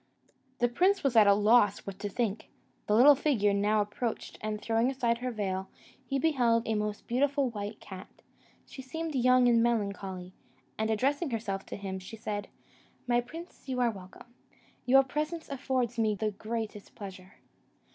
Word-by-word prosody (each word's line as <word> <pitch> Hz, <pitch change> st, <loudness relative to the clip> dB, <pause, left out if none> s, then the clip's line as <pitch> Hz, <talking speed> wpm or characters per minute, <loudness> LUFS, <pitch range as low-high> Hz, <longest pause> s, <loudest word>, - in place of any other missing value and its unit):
The 240 Hz, -, +3 dB
prince 370 Hz, +11 st, +2 dB
was 270 Hz, -4 st, +1 dB
at 215 Hz, -2 st, +7 dB
a 200 Hz, -, +7 dB
loss 210 Hz, -1 st, +4 dB
what 195 Hz, -1 st, -7 dB
to 205 Hz, -, -3 dB
think. 220 Hz, 0 st, -2 dB, 0.4 s
The 210 Hz, -, +3 dB
little 270 Hz, +6 st, +8 dB
figure 250 Hz, -8 st, +1 dB
now 210 Hz, +2 st, +2 dB
approached, 220 Hz, +3 st, -4 dB
and 215 Hz, 0 st, -3 dB
throwing 225 Hz, +3 st, +1 dB
aside 240 Hz, -3 st, 0 dB
her 250 Hz, +1 st, -2 dB
veil, 195 Hz, -4 st, -3 dB, 0.3 s
he 270 Hz, +2 st, -2 dB
beheld 245 Hz, -7 st, +2 dB
a 225 Hz, -, +1 dB
most 210 Hz, 0 st, -3 dB
beautiful 275 Hz, +1 st, +1 dB
white 210 Hz, 0 st, -6 dB
cat: 190 Hz, -1 st, -10 dB, 0.6 s
she 265 Hz, -, -10 dB
seemed 320 Hz, +5 st, -5 dB
young 255 Hz, -1 st, +4 dB
and 235 Hz, -1 st, +4 dB
melancholy; 200 Hz, -5 st, -2 dB, 0.4 s
and, 220 Hz, 0 st, -1 dB
addressing 275 Hz, +8 st, +1 dB
herself 210 Hz, -5 st, -3 dB
to -, -, -6 dB
him, 190 Hz, -1 st, -5 dB
she 185 Hz, +4 st, -9 dB
said, 205 Hz, -1 st, -4 dB, 0.6 s
"My 240 Hz, -1 st, +2 dB
prince, 320 Hz, +3 st, -11 dB
you 255 Hz, -1 st, -1 dB
are 240 Hz, -2 st, +3 dB
welcome; 195 Hz, +4 st, -13 dB, 0.5 s
your 270 Hz, +2 st, +7 dB
presence 305 Hz, +5 st, -3 dB
affords 255 Hz, -3 st, -1 dB
me 215 Hz, -2 st, +2 dB
the 215 Hz, +1 st, -1 dB
greatest 215 Hz, 0 st, -6 dB
pleasure." 190 Hz, -2 st, -10 dB
230 Hz, 165 wpm, -30 LUFS, 205-255 Hz, 0.6 s, little